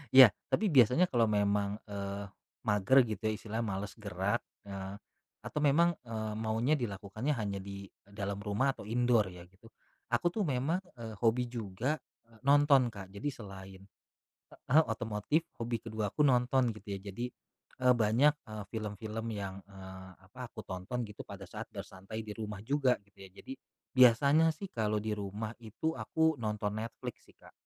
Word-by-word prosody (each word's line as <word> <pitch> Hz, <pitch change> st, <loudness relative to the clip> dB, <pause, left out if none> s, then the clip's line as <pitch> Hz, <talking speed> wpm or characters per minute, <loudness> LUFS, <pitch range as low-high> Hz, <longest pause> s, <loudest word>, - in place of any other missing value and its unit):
Iya, 130 Hz, -1 st, +13 dB, 0.2 s
tapi 215 Hz, -4 st, +2 dB
biasanya 130 Hz, +5 st, +6 dB
kalau 115 Hz, -3 st, +4 dB
memang, 100 Hz, -1 st, +1 dB
eee, 100 Hz, 0 st, -4 dB, 0.4 s
mager 105 Hz, +6 st, +4 dB
gitu 110 Hz, -3 st, -4 dB
ya, -, -, +2 dB
istilahnya 110 Hz, +2 st, -3 dB
malas 100 Hz, -1 st, -3 dB
gerak, 100 Hz, +2 st, -1 dB, 0.2 s
eee, 95 Hz, -1 st, -6 dB, 0.5 s
atau -, -, -3 dB
memang, 150 Hz, +4 st, +5 dB, 0.2 s
eee, 110 Hz, -1 st, -3 dB
maunya 115 Hz, +6 st, +2 dB
dilakukannya 110 Hz, +4 st, -2 dB
hanya 100 Hz, -4 st, -2 dB
di 100 Hz, 0 st, -7 dB, 0.2 s
dalam 100 Hz, 0 st, -4 dB
rumah 105 Hz, +6 st, +1 dB
atau -, -, -10 dB
indoor 120 Hz, -2 st, +3 dB
ya 90 Hz, -1 st, -10 dB
gitu. 95 Hz, +5 st, -19 dB, 0.4 s
Aku 175 Hz, -, +2 dB
tuh 205 Hz, -1 st, -1 dB
memang, 140 Hz, +6 st, +1 dB, 0.2 s
eee, 115 Hz, -2 st, -7 dB
hobi 120 Hz, +1 st, +3 dB
juga, 120 Hz, +6 st, -2 dB, 0.3 s
eee, 115 Hz, -1 st, -20 dB
nonton 140 Hz, -2 st, +6 dB
Kak. 100 Hz, -4 st, -8 dB
Jadi 100 Hz, +9 st, -4 dB
selain 95 Hz, -5 st, -10 dB, 0.9 s
heeh, 155 Hz, +5 st, +7 dB
otomotif, 110 Hz, +7 st, 0 dB, 0.2 s
hobi 115 Hz, -1 st, -1 dB
keduaku 110 Hz, +2 st, -3 dB
nonton 125 Hz, -2 st, +3 dB
gitu 105 Hz, -, -13 dB
ya. -, -, -7 dB
Jadi, 120 Hz, +5 st, -3 dB, 0.5 s
eee, 125 Hz, 0 st, +6 dB
banyak, 120 Hz, +6 st, +4 dB, 0.2 s
eee, 110 Hz, -1 st, -6 dB
film-film 110 Hz, 0 st, -4 dB
yang, 100 Hz, -2 st, -5 dB
eee, 95 Hz, -1 st, -10 dB
apa, 100 Hz, +7 st, -10 dB
aku -, -, -9 dB
tonton 95 Hz, +7 st, -4 dB
gitu 105 Hz, -, -9 dB
pada -, -, -8 dB
saat -, -, -7 dB
bersantai 100 Hz, +4 st, -7 dB
di 105 Hz, -, -6 dB
rumah 105 Hz, -2 st, -5 dB
juga 135 Hz, -1 st, +3 dB
gitu 100 Hz, -, -32 dB
ya. 95 Hz, -, -10 dB
Jadi 255 Hz, -, -9 dB, 0.4 s
biasanya 140 Hz, +6 st, +6 dB
sih 195 Hz, +4 st, -6 dB
kalo 105 Hz, -2 st, 0 dB
di 110 Hz, +1 st, -2 dB
rumah 105 Hz, +2 st, -4 dB
itu 115 Hz, +8 st, -2 dB
aku 160 Hz, -4 st, +1 dB
nonton 105 Hz, -2 st, -1 dB
Netflix 115 Hz, +1 st, -7 dB
sih, -, -, -21 dB
Kak. -, -, -17 dB
110 Hz, 165 wpm, -32 LUFS, 100-125 Hz, 0.9 s, Iya